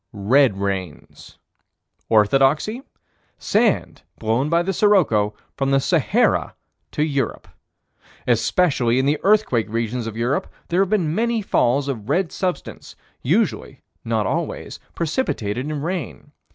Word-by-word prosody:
Red 110 +2 +3
rains. 95 -5 -5 0.7
Orthodoxy: 135 - +3 0.6
Sand - - 0 0.2
blown 115 +6 0
by 170 +1 +2
the 195 +2 -2
sirocco, 150 - +2 0.2
from 135 -1 -1
the 135 0 +3
Sahara - - +1 0.4
to 150 - 0
Europe. 140 -6 -2 0.8
Especially 120 +1 +2
in 130 - +2
the 145 +2 +1
earthquake 195 - +2
regions 115 +1 -2
of 110 0 -6
Europe, 120 +4 -1 0.2
there 175 +3 +2
have 195 - +1
been 180 -8 +1
many 230 +2 0
falls 135 -5 +1
of 120 -5 -5
red 175 +4 +1
substance, 185 -2 -4 0.3
usually, 165 - -1 0.2
but - - -9
not 110 -2 +1
always, - - -3 0.2
precipitated 145 - -2
in 150 -2 -4
rain. 170 -3 -5
135 Hz, 125 wpm, -21 LUFS, 115-175 Hz, 0.8 s, Red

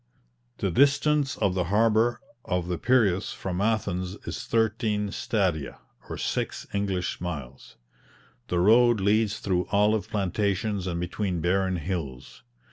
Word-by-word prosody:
The 95 - -1
distance 140 - +3
of 100 -4 +1
the 90 -2 0
harbour 110 +4 +2 0.2
of 90 -3 -2
the 90 -2 -2
Piraeus 105 -6 +2
from 95 0 -4
Athens 95 -4 -1
is - - -5
thirteen 110 -2 0
stadia, 90 - -1 0.3
or - - -5
six - - -3
English 95 -4 -2
miles. 70 -7 -7 0.7
The 90 - 0
road 115 +4 +5
leads 105 +2 +2
through 90 -2 -1
olive 105 +1 +2
plantations 100 0 -1
and 85 -2 -2
between 90 +1 -2
barren 95 +2 +1
hills. 70 -8 -5
100 Hz, 125 wpm, -26 LUFS, 90-110 Hz, 0.7 s, road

